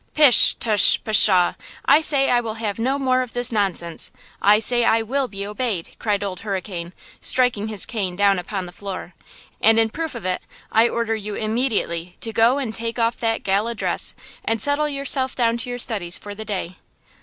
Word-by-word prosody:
"Pish! 290 -7 +6
tush! 210 -4 +4
pshaw! 195 -4 +4 0.3
I 290 +3 +5
say 280 -3 +3
I 245 -1 +3
will 220 -2 -6
have 220 -2 -4
no 260 +4 0
more 255 -2 +1
of 250 -2 -7
this 245 0 0
nonsense. 185 -6 0 0.3
I 205 +1 +5
say 240 +2 +3
I 225 0 +2
will 265 +4 -2
be 200 -3 -7
obeyed," 210 -4 -4
cried 205 -2 -1
Old 190 -2 -5
Hurricane, 185 -4 -6 0.3
striking 245 -5 +1
his 215 -3 +3
cane 195 -6 -4
down 200 -1 +2
upon 190 +1 -5
the 175 - -10
floor, 185 -1 -8 0.5
"and 225 0 +5
in 225 -1 +2
proof 320 -1 -5
of 235 - -8
it 185 0 -2 0.3
I 225 +2 +3
order 230 -1 -2
you 210 -1 -6
immediately 215 -7 -2
to 225 - -2
go 230 +5 +3
and 255 -6 -4
take 230 +1 -4
off 230 0 -1
that 225 -1 -2
gala 205 +4 0
dress - - 0 0.3
and 225 0 -1
settle 290 +3 +1
yourself 275 -2 0
down 235 -2 0
to 240 +1 -6
your 245 - -4
studies 200 -8 +2
for 205 - -9
the 220 +2 -9
day." 185 -4 -5
225 Hz, 195 wpm, -21 LUFS, 200-245 Hz, 0.5 s, Pish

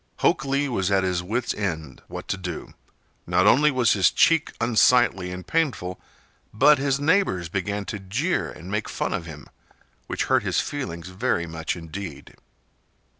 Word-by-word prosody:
Hok - - +2
Lee 140 +1 0
was 95 -7 -1
at 95 -1 +2
his 90 -2 0
wits' 110 +7 -2
end 80 -9 -4
what - - -8
to - - +1
do. 90 -3 -6 0.5
Not - - +3
only 150 +4 +6
was 125 -6 +3
his 95 -4 +4
check 165 -2 +3
unsightly 115 -5 +3
and 90 -1 -7
painful, 120 - -1 0.5
but 145 +5 +5
his 140 0 +1
neighbors 145 - +1
began 100 +3 -2
to 105 - -5
jeer 120 - -1
and 90 +5 -10
make 105 +1 -2
fun - - -2
of 85 - -4
him, 75 -4 -10 0.6
which - - -1
hurt - - +2
his - - 0
feelings 90 - -4
very 95 -3 -1
much 80 -1 -4
indeed. 80 -3 -8
100 Hz, 165 wpm, -24 LUFS, 90-130 Hz, 0.6 s, only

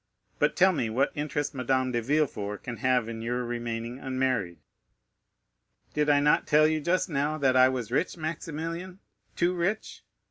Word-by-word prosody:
But 150 +1 +2
tell 190 +1 +5
me 120 -8 -1
what 130 +5 +1
interest 145 -1 -2
Madame 130 0 0
de 120 -1 0
Villefort 115 -7 -1
can 120 -2 -5
have 125 -3 +1
in 115 -1 -6
your 120 +2 -2
remaining 120 +1 -4
unmarried?" 130 -10 -1 1.4
"Did 150 0 +1
I 145 -1 +5
not 150 +1 +3
tell 150 +1 +5
you 155 0 0
just 180 +5 +1
now 150 -1 -1
that 135 -3 +2
I 130 0 +7
was 125 -4 -4
rich, 165 +7 0
Maximilian—too 165 +3 -4
rich? 185 +5 -2
135 Hz, 155 wpm, -28 LUFS, 120-155 Hz, 1.4 s, I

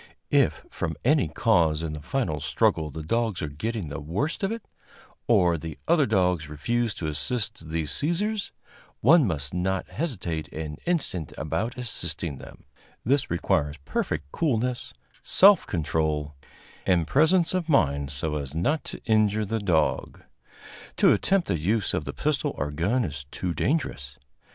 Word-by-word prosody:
If - - +2
from 80 -3 -3
any 145 - +4
cause 80 -3 +2
in 80 -2 -3
the 75 - -6
final 80 - -1
struggle 75 +1 +1
the 80 +2 -7
dogs 115 +3 0
are - - -1
getting 95 +4 -4
the 70 +2 -5
worst 90 - -2
of 195 +1 0
it, 230 -2 -6 0.6
or 85 -2 +4
the 80 0 -7
other 160 -4 +4
dogs 90 -7 +1
refuse 115 +9 -1
to 85 - -5
assist 95 +3 -2
the 80 0 -1
seizers, 195 - -1 0.5
one 150 +1 +6
must 70 -5 -2
not 95 +1 -1
hesitate 95 - -3
an 75 -1 -5
instant 135 - -1
about 110 - -2
assisting 85 - -4
them; - - -12 0.4
this 140 +3 +2
requires 75 -3 0
perfect 75 +1 -2
coolness, 125 -3 -1 0.3
self 195 +8 +6
control 75 -2 -1 0.5
and 90 -3 +2
presence 165 - +3
of 180 -3 -1
mind, 70 - +2
so 75 +2 -2
as 70 0 -5
not 145 - +1
to - - -7
injure 110 -1 +3
the 110 +3 -1
dog. 90 -6 0 0.7
To - - +6
attempt 195 -2 +1
the 85 - 0
use 105 +6 +1
of 75 - -1
the 70 - -4
pistol 150 -1 -1
or 75 +2 -2
gun 100 - +1
is 70 -4 -6
too 90 +3 -3
dangerous. 80 - -2
90 Hz, 155 wpm, -26 LUFS, 75-125 Hz, 0.7 s, one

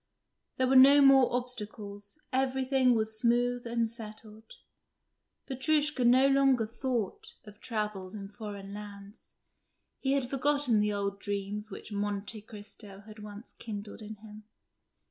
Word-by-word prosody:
There 260 - +2
were 260 +1 +2
no 275 +2 +9
more 270 -2 +6
obstacles, 215 -2 -6
everything 260 -1 +2
was 220 0 -1
smooth 245 +1 +1
and 230 -1 0
settled. 220 -1 -8 1.0
Petrushka 295 +1 +1
no 255 +3 +6
longer 270 -4 +4
thought 260 - -3
of 210 -1 -14
travels 210 -4 -4
in 200 -2 -6
foreign 200 -1 -8
lands; 205 0 -11 0.6
he 270 0 0
had 275 -3 0
forgotten 275 -3 +2
the 210 0 +2
old 200 -1 -2
dreams 205 +1 -4
which 210 - -9
"Monte 205 +1 -3
Cristo" 205 -2 -10
had 215 +1 -13
once 210 +1 -10
kindled 210 -1 -8
in 215 0 -7
him. 210 0 -13
220 Hz, 130 wpm, -30 LUFS, 205-260 Hz, 1.0 s, no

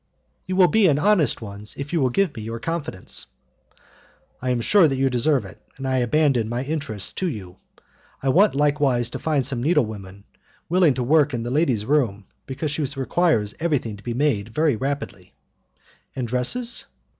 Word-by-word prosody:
"You 185 - -2
will 185 -1 +6
be 220 0 +4
in 145 -4 +3
honest 165 - +2
ones, 105 0 -6
if 140 +4 -6
you 165 - +2
will 130 - +3
give 160 +3 0
me 110 - -6
your 115 +2 -5
confidence." 155 - -5 1.1
"I 130 - -2
am 125 -1 +1
sure 180 - +4
that 135 -2 -1
you 135 0 +1
deserve 125 -1 +1
it, 95 - -13 0.2
and 135 0 -5
I 130 0 +1
abandon 125 -2 +2
my 120 +2 -2
interests 135 -9 -1
to 185 - -2
you. 95 - -8 0.7
I 135 - +1
want 185 +5 +4
likewise 140 -4 +1
to - - -5
find 150 -5 0
some 130 -2 -3
needlewomen 105 - -1 0.5
willing 175 -5 +4
to 125 - -1
work 145 +1 +3
in 115 - -3
the 120 - -4
lady's 130 -8 +1
room, 115 -8 0 0.2
because 140 +3 -3
she 150 - -2
requires 135 -6 +1
everything 145 -10 -1
to 100 - -15
be 120 -1 -4
made 125 -7 0
very 150 +3 +1
rapidly." 140 +5 -5 0.8
"And 125 -2 -3
dresses?" 130 - +1
135 Hz, 180 wpm, -23 LUFS, 115-155 Hz, 1.1 s, will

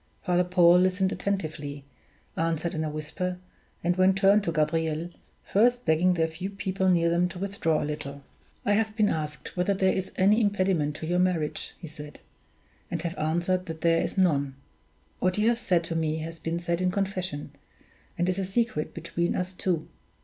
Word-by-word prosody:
Father 180 0 +2
Paul 180 -1 +5
listened 185 +1 +2
attentively, 150 -7 -3 0.5
answered 165 +1 -1
in 160 - -1
a 155 - -1
whisper, 160 +5 -3 0.5
and 175 +1 +2
then 185 +1 +4
turned 195 +1 +4
to 170 - 0
Gabriel, 160 +1 0 0.3
first 245 +4 +2
begging 170 +3 +3
the 165 -1 +2
few 170 +4 -5
people 190 -1 -1
near 170 -2 +3
them 170 +1 +2
to 180 - -9
withdraw 180 -5 0
a - - -2
little. 145 -2 -5 0.4
"I 205 - +3
have 215 0 +1
been 215 -2 +3
asked 150 -1 -4
whether 180 +2 +1
there 190 0 +2
is 190 0 -3
any 205 +4 +4
impediment 185 -8 +1
to 160 - -6
your 175 +2 +1
marriage," 175 -5 -1
he - - -10
said, 150 -1 -10 0.7
"and 170 - -2
have 170 0 -3
answered 175 +4 0
that 160 -1 -6
there 165 0 +3
is - - -3
none. 140 -7 +2 0.6
What 185 +1 +1
you 210 +1 +3
have 235 0 +1
said 180 -7 +1
to 165 0 -4
me 160 -1 0
has 165 +1 -6
been 165 +2 -2
said 170 0 -1
in 185 - +2
confession, 185 -6 -3 0.7
and 175 - +1
is 185 +1 0
a 195 - -1
secret 195 -5 -1
between 170 +1 -1
us 180 +1 -2
two. 170 -3 -1
175 Hz, 185 wpm, -27 LUFS, 160-190 Hz, 0.7 s, Paul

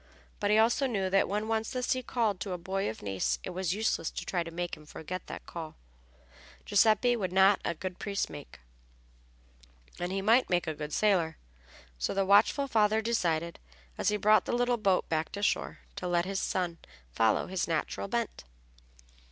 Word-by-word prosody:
But 205 - 0
he 210 - +5
also 240 +5 +3
knew 195 -6 -1
that 195 - +3
when 210 +2 -1
once 220 0 -1
the 255 -1 -3
sea 255 +1 0
called 225 -6 -1
to 195 - -4
a - - -3
boy 190 +3 -2
of 110 - -8
Nice 95 -12 -1
it - - -5
was 185 0 -1
useless 210 -6 0
to - - -6
try 180 - -1
to 165 - -5
make 175 +1 -4
him 155 - -15
forget 160 +4 -7
the - - -7
call. 160 -2 -7 0.9
Giuseppe 220 +4 +4
would 190 -6 -2
not 190 +2 +5
make - - 0
a 170 - -8
good 185 +1 -6
priest, 200 -1 -1
and - - -13
he 195 0 -2
might 230 +5 +4
make 175 -1 +1
a 160 - -2
good 150 0 -6
sailor. 175 -6 +2 0.6
So - - -1
the 195 0 +2
watchful 205 +8 +4
father 220 -2 +2
decided, 170 -8 0 0.4
as - - +1
he 210 - +1
brought 215 +1 +4
the - - -2
little 245 0 +2
boat 195 -4 +1
back 160 0 -1
to 205 - -4
shore, - - 0 0.2
to 180 - -3
let 175 0 +1
his 195 0 -2
son 175 -2 -2 0.3
follow 110 - +2
his 185 -1 -2
natural 165 +4 -2
bent. 235 +1 -3
185 Hz, 195 wpm, -30 LUFS, 160-210 Hz, 0.9 s, he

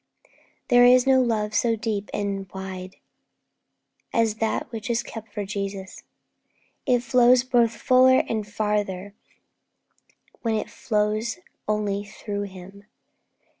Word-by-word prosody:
There 245 -1 +6
is 250 0 +6
no 265 -1 +5
love 215 -3 0
so 230 +2 +2
deep 210 -2 -3
and 195 -2 -3
wide 190 -1 -7 1.2
as 225 -2 +1
that 225 +1 -2
which 225 0 -6
is 235 0 0
kept 220 -2 -9
for 205 -1 -4
Jesus. 195 -1 -5 0.9
It 245 -2 +3
flows 245 0 +5
both 240 -3 +2
fuller 260 0 +5
and 215 -2 -2
farther 205 -2 -2 1.3
when 225 -2 0
it 215 - -3
flows 215 +3 -1 0.3
only 205 -1 -1
through 205 0 -5
Him. 195 +1 -12
215 Hz, 120 wpm, -24 LUFS, 200-235 Hz, 1.3 s, There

